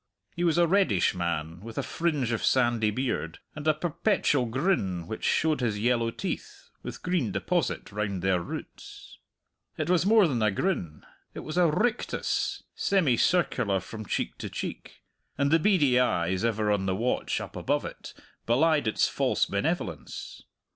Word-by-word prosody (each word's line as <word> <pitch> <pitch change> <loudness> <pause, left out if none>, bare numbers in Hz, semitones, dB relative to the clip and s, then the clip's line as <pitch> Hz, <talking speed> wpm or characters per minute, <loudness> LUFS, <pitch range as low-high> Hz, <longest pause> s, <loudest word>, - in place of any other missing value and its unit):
He 175 - -2
was 170 -1 +2
a 175 - +5
reddish 165 - +3
man, 85 -2 -3
with 115 +3 -10
a - - 0
fringe 150 -8 -1
of 115 - -1
sandy 120 -4 +3
beard, 105 - -2 0.2
and 150 0 -5
a 155 - +5
perpetual 155 - +1
grin 115 - 0
which 110 - -6
showed 155 -1 +2
his 110 -4 0
yellow 115 +1 +1
teeth, - - -6
with - - -8
green 175 - 0
deposit - - -1
round 100 -3 -3
their 95 -2 +2
roots. - - -9 0.6
It 155 +2 -1
was 180 -2 +3
more 210 -1 +5
than 125 -7 -1
a 110 - +4
grin 95 - -2 0.3
it - - -5
was 155 - -6
a 175 -2 +4
rictus, 225 +9 -1
semicircular 155 - +2
from 110 +1 -8
cheek - - -2
to - - -5
cheek; - - -7 0.3
and 140 +1 +1
the 165 - +5
beady 155 -10 +4
eyes, 90 -5 +1
ever 110 -2 +1
on 100 -2 0
the 95 - +1
watch 120 +5 -1
up - - -8
above - - 0
it, - - -9 0.3
belied 145 +3 +3
its 110 - +2
false - - +1
benevolence. - - -3
125 Hz, 160 wpm, -27 LUFS, 100-165 Hz, 0.6 s, a